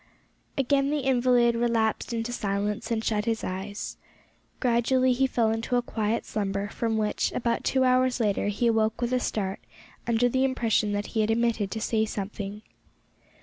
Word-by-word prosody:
Again 275 +1 +2
the 295 0 0
invalid 245 -2 +3
relapsed 230 -1 0
into 230 0 -2
silence 205 -1 -2
and 225 -1 -1
shut 210 -1 0
his 225 -1 -1
eyes. 195 +2 -5 0.6
Gradually 255 +1 +2
he 265 +2 +2
fell 230 -3 +1
into 225 +2 -1
a 245 - +2
quiet 220 -1 -1
slumber, 200 -1 -2
from 225 0 -1
which, 215 -1 0
about 235 -1 -1
two 260 -1 +2
hours 255 0 +3
later, 205 -3 +1
he 205 +4 -1
awoke 225 -1 +2
with 240 +1 -1
a 250 - +3
start 195 -5 -2 0.5
under 235 +1 +3
the 260 +2 +1
impression 230 -5 +1
that 205 0 -1
he 220 - +2
had 215 - +1
omitted 225 -3 +1
to 220 - -4
say 220 0 +1
something. 205 0 -5
230 Hz, 170 wpm, -27 LUFS, 210-245 Hz, 0.6 s, invalid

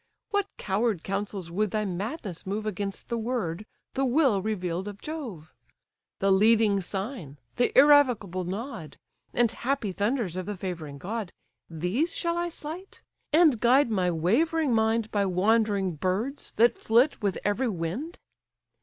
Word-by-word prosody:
What 405 -1 +1
coward 205 -2 0
counsels 195 -3 -3
would 210 +4 0
thy 215 +2 -1
madness 195 - -5
move 210 +3 -2
Against 200 -1 -4
the 235 -1 -2
word, 215 -5 -3 0.3
the 270 - 0
will 260 -6 +3
reveal'd 185 -3 -2
of 205 -1 -7
Jove? 235 - -7 0.6
The 195 0 +2
leading 210 0 +4
sign, 190 - -5 0.2
the 245 - +2
irrevocable 250 -10 +5
nod, 185 - -6 0.3
And 240 -2 +2
happy 245 -4 -2
thunders 205 -1 -1
of 185 0 -4
the 210 -2 -4
favouring 165 -6 -5
god, 200 +4 -4 0.4
These 180 - -1
shall 340 0 0
I 345 0 -1
slight, 335 +4 -8 0.3
and 305 -6 +5
guide 245 +2 +4
my 185 -4 +1
wavering 255 - +1
mind 220 0 +1
By 200 -2 +1
wandering 200 -1 +1
birds 205 - -2
that 235 +1 +4
flit 240 +6 +3
with 200 -3 0
every 220 +5 +1
wind? 205 - -4
215 Hz, 145 wpm, -27 LUFS, 185-250 Hz, 0.6 s, irrevocable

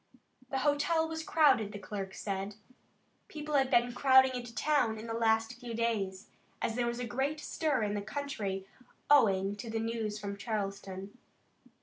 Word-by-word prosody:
The 270 - -1
hotel 320 +3 +2
was 320 0 -4
crowded, 295 - +3
the - - -5
clerk 195 -1 -6
said. 195 0 -3 0.7
People 300 -1 -6
had 270 -2 +3
been 240 0 +3
crowding 265 0 +6
into 240 -2 -6
town 285 -7 +2
in 215 - -7
the 225 - -4
last 225 0 +1
few 240 -2 -6
days, 205 -5 -1 0.3
as 225 - -1
there 240 -1 0
was 235 0 -2
a 245 - -3
great 270 +6 -1
stir 300 -5 0
in 205 -1 -1
the 205 - -2
country 210 -5 -4 0.5
owing 200 -8 +5
to 225 +3 -7
the 225 0 -1
news 225 -2 -2
from 200 -1 -5
Charleston. 200 -1 -4
230 Hz, 165 wpm, -32 LUFS, 205-270 Hz, 0.7 s, crowding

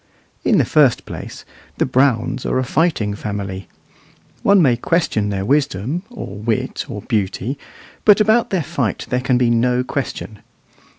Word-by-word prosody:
In - - +3
the - - +3
first 145 -6 +3
place, - - -8 0.3
the - - +2
Browns 130 -2 +1
are - - 0
a 130 - +1
fighting 130 -7 0
family. 100 -2 -5 0.7
One 200 0 +5
may 135 -8 +4
question 120 -6 0
their 100 -1 -2
wisdom, 140 - 0
or 215 - -8
wit, 110 +1 -2
or - - -6
beauty, 105 +4 -1 0.5
but 210 -1 +6
about 220 +2 +3
their 185 -4 0
fight 120 -7 -2
there 125 0 +1
can 125 -1 +2
be 120 -1 +2
no 125 +2 +2
question. 125 -5 -5
125 Hz, 155 wpm, -19 LUFS, 105-150 Hz, 0.7 s, but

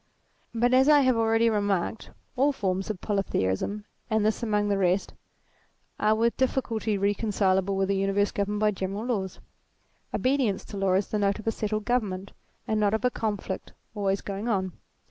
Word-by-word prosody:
But, 245 +2 +2
as 265 +3 +5
I 295 -1 +7
have 260 -2 +3
already 225 0 +3
remarked, 205 -1 0 0.3
all 275 +3 +3
forms 195 -6 -2
of 210 -4 -4
polytheism, 200 - -1 0.2
and 220 -1 +2
this 215 +2 +1
among 210 -3 +1
the 200 -1 +1
rest, 185 +1 +1 0.9
are 215 +1 +3
with 230 +1 +1
difficulty 230 -5 0
recon 205 +3 0
cileable 195 -1 +1
with 195 0 +1
an 195 - +1
universe 195 +1 +1
governed 205 +1 -2
by 215 0 +4
general 195 +2 -4
laws. 195 -7 -2 0.7
Obedience 255 -6 0
to 205 - -8
law 195 -1 +1
is 190 +1 +1
the 210 - -1
note 200 -1 +1
of 215 - -10
a 225 - +2
settled 215 -1 -2
government, 200 -6 -1 0.4
and 220 -1 +1
not 210 0 +2
of 220 - -2
a 250 - +3
conflict 205 -4 -4 0.2
always 200 -2 0
going 200 +3 -5
on. 190 -5 0
210 Hz, 180 wpm, -27 LUFS, 195-225 Hz, 0.9 s, I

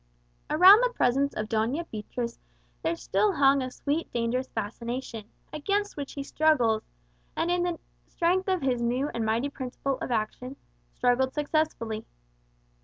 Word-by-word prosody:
Around 375 +7 +8
the - - +3
presence 275 - +1
of 215 - -3
Doña 230 +10 0
Beatriz 235 +2 -5 0.4
there 330 +1 0
still 410 +4 +1
hung 275 -3 +4
a 255 - -3
sweet 290 +5 -3
dangerous 240 +2 -1
fascination, 230 +1 -5 0.3
against 405 +7 -1
which 285 -2 -6
he 280 - -4
struggled, 260 -8 +2 0.5
and, 340 - 0
in 355 0 +1
the 350 -1 -1 0.3
strength 365 +3 +1
of 370 -5 0
his 250 -3 +1
new 250 +5 0
and 230 - -2
mighty 225 +5 0
principle 265 0 -4
of - - -4
action, 245 +3 -2 0.4
struggled 260 +1 +1
successfully. 295 -8 -1
265 Hz, 145 wpm, -27 LUFS, 235-315 Hz, 0.5 s, Around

